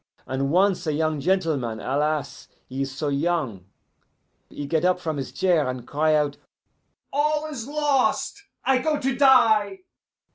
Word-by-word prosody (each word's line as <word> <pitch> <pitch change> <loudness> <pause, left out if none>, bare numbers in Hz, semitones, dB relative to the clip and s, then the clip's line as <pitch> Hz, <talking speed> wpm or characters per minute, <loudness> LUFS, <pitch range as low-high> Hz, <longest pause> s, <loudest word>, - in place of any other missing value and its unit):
And 135 +1 -2
once 185 +2 +2
a 155 - +1
young 155 0 0
gentleman 145 - 0
alas! 150 +3 -2 0.2
he 130 +1 -5
is 135 0 -2
so 145 +3 -3
young 140 - -1 0.8
he 145 - -6
get 160 +3 0
up 180 0 +2
from 160 -4 -3
his 135 - -5
chair, 170 -8 +1
and 125 -1 -6
cry 155 +1 +2
out, 145 -1 0 0.8
'All 300 +2 +1
is 270 -7 -6
lost! 290 +5 0 0.2
I 265 0 +3
go 300 +2 0
to 265 -1 -1
die! 255 - +4
160 Hz, 150 wpm, -24 LUFS, -, 0.8 s, die